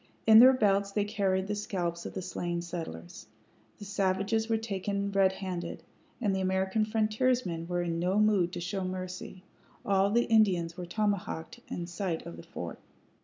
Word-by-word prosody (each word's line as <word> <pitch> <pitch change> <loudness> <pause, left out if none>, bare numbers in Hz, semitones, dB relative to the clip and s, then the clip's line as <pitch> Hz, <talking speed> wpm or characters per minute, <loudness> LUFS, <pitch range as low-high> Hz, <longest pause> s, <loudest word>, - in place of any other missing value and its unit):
In 220 0 +9
their 255 +2 +9
belts 200 -4 +2
they 205 0 0
carried 190 -2 0
the 210 - -2
scalps 175 -5 -3
of - - -10
the 185 - -3
slain 175 -1 -3
settlers. 160 - -7 0.5
The 205 - -9
savages 200 +3 0
were 225 - +3
taken 200 -2 -2
redhanded, 190 -2 -1 0.4
and 205 -5 +1
the 190 - -1
American 190 +3 +1
frontiersmen 215 -5 0
were 175 0 -1
in 165 -1 -2
no 180 +3 +1
mood 210 -5 +3
to - - -4
show 185 +3 -3
mercy. 185 0 -6 0.4
All 195 -2 +3
the 235 +3 +3
Indians 185 -7 +3
were 180 -1 -6
tomahawked 205 +1 -2
in 175 - -4
sight 175 -1 -3
of 85 - -7
the - - -8
fort. - - -7
190 Hz, 170 wpm, -30 LUFS, 175-210 Hz, 0.5 s, In